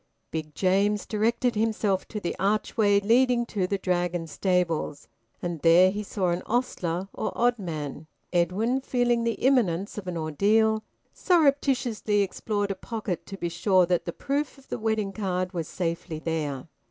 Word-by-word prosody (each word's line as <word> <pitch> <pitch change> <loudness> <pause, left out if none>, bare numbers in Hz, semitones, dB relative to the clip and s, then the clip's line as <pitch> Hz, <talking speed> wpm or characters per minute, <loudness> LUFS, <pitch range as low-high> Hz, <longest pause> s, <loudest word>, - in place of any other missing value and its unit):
Big 155 -2 -5
James 200 +2 +2
directed 235 +3 +1
himself 210 -3 0
to 215 - -5
the 175 - -3
archway 205 +1 +2
leading 240 +3 +3
to 195 -5 -1
the 200 - 0
Dragon 175 -2 -1
stables, 170 -3 -1 0.4
and 175 -2 -3
there 175 +4 +6
he 205 +2 -3
saw 195 -3 -1
an 175 +1 -1
ostler 190 -7 -1
or - - -2
oddman. 165 - -1 0.3
Edwin, 200 +10 +1
feeling 245 -2 +1
the 230 0 +1
imminence 205 -8 +1
of 190 - -10
an 175 -2 -3
ordeal, 215 +8 +2 0.3
surreptitiously 270 - +2
explored 205 +1 -2
a - - -2
pocket 210 -3 -5
to 195 - -7
be 175 - -2
sure 185 +2 +3
that 175 -1 0
the 170 - -2
proof 280 - -2
of 270 - -20
the - - -3
wedding 220 -3 -1
card 185 -3 -2
was 165 -3 -3
safely 170 -2 -3
there. 155 -4 -3
195 Hz, 155 wpm, -26 LUFS, 175-225 Hz, 0.4 s, there